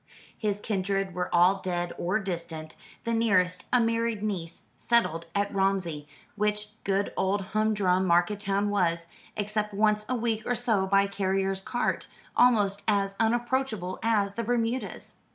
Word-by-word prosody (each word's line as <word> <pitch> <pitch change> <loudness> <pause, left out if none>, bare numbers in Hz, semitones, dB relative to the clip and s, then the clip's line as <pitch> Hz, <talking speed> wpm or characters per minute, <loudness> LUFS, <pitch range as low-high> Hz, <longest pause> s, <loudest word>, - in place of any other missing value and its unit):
His 205 -2 -2
kindred 195 -2 -1
were 180 +1 -2
all 180 +3 +4
dead 175 -1 -2
or 180 +5 0
distant 170 -5 -5 0.3
the 230 - -1
nearest, 185 -6 +2
a 250 - +5
married 230 -2 0
niece, 175 -6 -4
settled 170 -9 +1
at 200 0 0
Romsey, 190 -6 0 0.3
which 210 0 -1
good 195 0 0
old 195 +2 +1
humdrum 200 -4 +2
market 175 +4 +3
town 200 0 0
was 170 -4 +1 0.3
except 210 0 -2
once 210 0 +2
a 255 - +1
week 225 -2 0
or 245 - +1
so 220 -5 +1
by 195 +1 +4
carrier's 195 -1 -1
cart 240 +5 -1 0.3
almost 205 -5 +4
as 200 -2 +2
unapproachable 230 -4 0
as 210 -3 +1
the 230 - -3
Bermudas. 240 +2 -2
200 Hz, 145 wpm, -28 LUFS, 185-220 Hz, 0.3 s, a